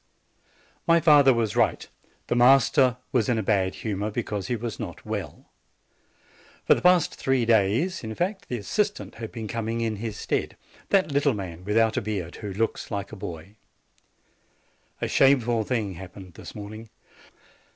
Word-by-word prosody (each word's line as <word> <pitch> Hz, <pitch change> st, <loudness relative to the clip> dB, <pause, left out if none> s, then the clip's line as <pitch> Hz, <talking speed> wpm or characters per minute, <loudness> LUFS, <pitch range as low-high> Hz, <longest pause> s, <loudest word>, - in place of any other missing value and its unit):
MY 170 Hz, 0 st, +6 dB
father 145 Hz, -4 st, +6 dB
was 115 Hz, -4 st, 0 dB
right; -, -, +1 dB, 0.4 s
the -, -, -1 dB
master 130 Hz, +1 st, +5 dB
was 120 Hz, -4 st, +1 dB
in 120 Hz, -, +2 dB
a 110 Hz, -, -1 dB
bad 95 Hz, -2 st, +1 dB
hu 110 Hz, -3 st, -3 dB
mor 105 Hz, +2 st, -2 dB
because 105 Hz, -3 st, -3 dB
he 120 Hz, -, 0 dB
was 115 Hz, 0 st, -5 dB
not -, -, -7 dB
well; -, -, -6 dB, 1.1 s
for -, -, +6 dB
the -, -, -2 dB
last 180 Hz, -2 st, +4 dB
three 130 Hz, -3 st, 0 dB
days, 115 Hz, -, +2 dB
in 110 Hz, -1 st, -5 dB
fact, 190 Hz, -, -3 dB
the 125 Hz, -, -2 dB
assistant 205 Hz, -, -2 dB
has 115 Hz, -1 st, -7 dB
been 110 Hz, -2 st, -6 dB
coming 115 Hz, +1 st, -3 dB
in 110 Hz, -2 st, -1 dB
his 110 Hz, -1 st, -5 dB
stead, -, -, -2 dB, 0.3 s
that 190 Hz, -6 st, +3 dB
little 140 Hz, -2 st, +2 dB
man, 90 Hz, -3 st, -7 dB
without 110 Hz, +2 st, +2 dB
a -, -, +1 dB
beard, 95 Hz, -5 st, -4 dB
who 105 Hz, -2 st, -6 dB
looks 110 Hz, +4 st, -2 dB
like 100 Hz, -2 st, -4 dB
a -, -, -7 dB
boy. 90 Hz, +3 st, -8 dB, 1.5 s
A -, -, +1 dB
shameful 120 Hz, -4 st, +3 dB
thing 110 Hz, -4 st, -2 dB
happened 90 Hz, +1 st, -11 dB
this -, -, -11 dB
morning. 110 Hz, +2 st, -8 dB
115 Hz, 165 wpm, -25 LUFS, 100-130 Hz, 1.5 s, MY